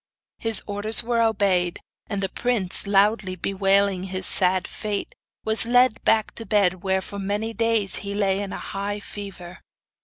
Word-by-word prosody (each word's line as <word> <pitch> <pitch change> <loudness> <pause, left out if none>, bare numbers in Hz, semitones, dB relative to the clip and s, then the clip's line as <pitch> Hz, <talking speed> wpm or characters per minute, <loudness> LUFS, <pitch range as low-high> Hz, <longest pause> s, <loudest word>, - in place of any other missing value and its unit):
His 225 -1 +2
orders 205 +2 +2
were 235 0 0
obeyed, 195 -6 +1 0.3
and 200 -2 -3
the 190 - -1
prince, 210 -6 0
loudly 200 -1 +2
bewailing 195 0 +1
his 185 0 -4
sad 185 -1 +2
fate, 210 -2 -4 0.3
was 220 +1 +2
led 245 -1 +3
back 220 -1 +2
to - - -4
bed, 190 -4 +2
where 190 -1 0
for 200 - -7
many 205 +3 -2
days 225 -4 +1
he 200 0 -4
lay 195 -1 +1
in 200 -1 -5
a - - -4
high 205 +1 -4
fever. 190 -3 -9
200 Hz, 160 wpm, -23 LUFS, 190-220 Hz, 0.3 s, led